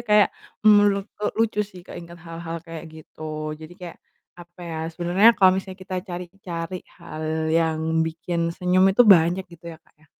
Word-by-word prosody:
kayak, 210 Hz, -1 st, +6 dB, 0.4 s
menurutku 205 Hz, 0 st, +3 dB
lucu 225 Hz, -2 st, +1 dB
sih 180 Hz, -2 st, -12 dB
keingat 170 Hz, 0 st, -10 dB
hal-hal 165 Hz, 0 st, -6 dB
kayak 165 Hz, 0 st, -8 dB
gitu. 155 Hz, 0 st, -13 dB, 0.4 s
Jadi 155 Hz, +2 st, -10 dB
kayak, 175 Hz, -2 st, -9 dB, 0.4 s
apa 175 Hz, +1 st, -15 dB
ya, 160 Hz, -, -5 dB, 0.2 s
sebenernya 175 Hz, +6 st, +4 dB
kalau 190 Hz, -2 st, +6 dB
misalnya 190 Hz, 0 st, -6 dB
kita 185 Hz, 0 st, -4 dB
cari-cari 180 Hz, 0 st, -6 dB, 0.2 s
hal 155 Hz, +1 st, -4 dB
yang 160 Hz, -1 st, +2 dB, 0.3 s
bikin 170 Hz, +1 st, -3 dB, 0.2 s
senyum 180 Hz, +1 st, +3 dB
itu 245 Hz, -, +6 dB
banyak 175 Hz, +3 st, +1 dB
gitu 170 Hz, 0 st, -16 dB
ya, -, -, -16 dB
Kak, -, -, -31 dB
ya. 155 Hz, -, -24 dB
175 Hz, 160 wpm, -23 LUFS, 165-190 Hz, 0.4 s, kayak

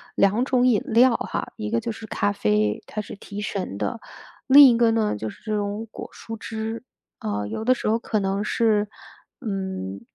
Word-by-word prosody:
2 210 Hz, +6 st, +3 dB
种 255 Hz, -2 st, +3 dB
饮 225 Hz, -5 st, +4 dB
料 245 Hz, -1 st, +5 dB
哈， -, -, -4 dB
一 215 Hz, -1 st, -5 dB
个 230 Hz, -, +2 dB
就 230 Hz, 0 st, -3 dB
是 220 Hz, 0 st, -9 dB
咖 205 Hz, -1 st, 0 dB
啡， 105 Hz, -, 0 dB
它 215 Hz, -, -4 dB
是 210 Hz, -, -9 dB
提 205 Hz, 0 st, -8 dB
神 195 Hz, -, -4 dB
的。 235 Hz, -, -2 dB, 0.5 s
另 280 Hz, +1 st, +9 dB
一 235 Hz, -, +4 dB
个 230 Hz, -1 st, +4 dB
呢， 220 Hz, -, +1 dB
就 110 Hz, +1 st, -4 dB
是 -, -, -14 dB
这 215 Hz, -2 st, -2 dB
种 205 Hz, +2 st, -3 dB
果 -, -, -8 dB
蔬 225 Hz, 0 st, -8 dB
汁， 225 Hz, +1 st, -5 dB, 0.4 s
呃， 105 Hz, -1 st, -3 dB
有 220 Hz, -, -4 dB
的 255 Hz, -, +5 dB
时 240 Hz, -, -4 dB
候 225 Hz, -, +3 dB
可 220 Hz, -2 st, -1 dB
能 195 Hz, +1 st, -1 dB
是， 210 Hz, -1 st, +2 dB, 0.5 s
嗯， 190 Hz, -, -4 dB
215 Hz, 205 characters per minute, -24 LUFS, 195-230 Hz, 0.5 s, 另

